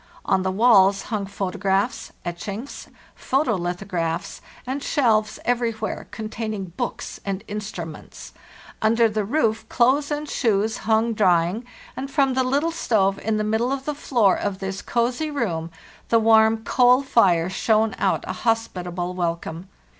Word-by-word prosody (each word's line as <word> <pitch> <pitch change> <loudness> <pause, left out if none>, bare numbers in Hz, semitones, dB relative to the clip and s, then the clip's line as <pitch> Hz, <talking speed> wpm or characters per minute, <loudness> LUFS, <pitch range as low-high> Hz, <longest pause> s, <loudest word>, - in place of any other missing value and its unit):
On 190 - +2
the 190 - -1
walls 195 -2 +5
hung 200 -2 -1
photographs, 200 +3 -1
etchings, 200 +9 -6 0.3
photo 265 -2 0
lithographs, 175 -2 -3 0.2
and 265 +3 -3
shelves 220 -7 +1
everywhere, 235 -2 -1
containing 215 -4 -5
books - - -4
and 195 0 -3
instruments; 195 -7 -7 0.5
under 230 +1 +4
the 215 -1 -1
roof 220 -1 0
clothes 265 +4 +2
and 300 0 -3
shoes 220 -3 0
hung 225 +1 +3
drying, 185 +2 +2 0.3
and 270 +1 -5
from 275 -1 +2
the 260 0 +2
little 285 +6 +1
stove 200 - +1
in 220 -1 -1
the 215 - 0
middle 220 +4 0
of 270 -1 -3
the 300 - -1
floor 235 -8 +2
of 200 -2 -3
this 195 0 -5
cozy 245 +6 -1
room 180 - -2 0.4
the 230 - +5
warm 220 0 +4
coal 250 +2 +4
fire 185 -10 +3
shone 215 +3 +1
out - - +1
a - - -2
hospitable 180 -6 -2
welcome. 170 0 -3
220 Hz, 140 wpm, -23 LUFS, 190-245 Hz, 0.5 s, walls